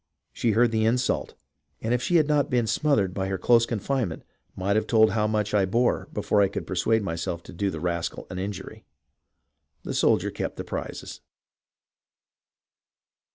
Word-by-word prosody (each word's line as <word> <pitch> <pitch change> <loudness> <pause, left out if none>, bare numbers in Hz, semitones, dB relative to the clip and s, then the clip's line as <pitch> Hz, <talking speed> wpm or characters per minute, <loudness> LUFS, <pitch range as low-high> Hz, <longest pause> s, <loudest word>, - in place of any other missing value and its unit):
She 115 -3 +1
heard 120 +2 +4
the 110 -1 +1
insult, 125 +3 0 0.4
and 115 +2 -1
if 125 - +1
she 175 +6 0
had 155 -3 +5
not 145 -1 +2
been 125 -4 +2
smothered 110 - +1
by 95 0 -2
her 95 0 -2
close 115 +3 +4
confinement, 115 - -2 0.3
might 100 +2 0
have 110 - +1
told 110 -2 +5
how 105 0 +1
much 105 -1 -1
I 105 -2 +4
bore 120 +6 +1
before 105 - +1
I 100 - +5
could 95 - -5
persuade 105 +4 +1
myself 85 -1 -3
to - - -12
do 100 +3 -1
the 80 - -5
rascal 85 0 -3
an 90 - -4
injury." 100 +3 -6 1.0
The - - -4
soldier - - +2
kept - - -4
his - - -5
prizes. - - -6
110 Hz, 170 wpm, -26 LUFS, 95-120 Hz, 1.0 s, had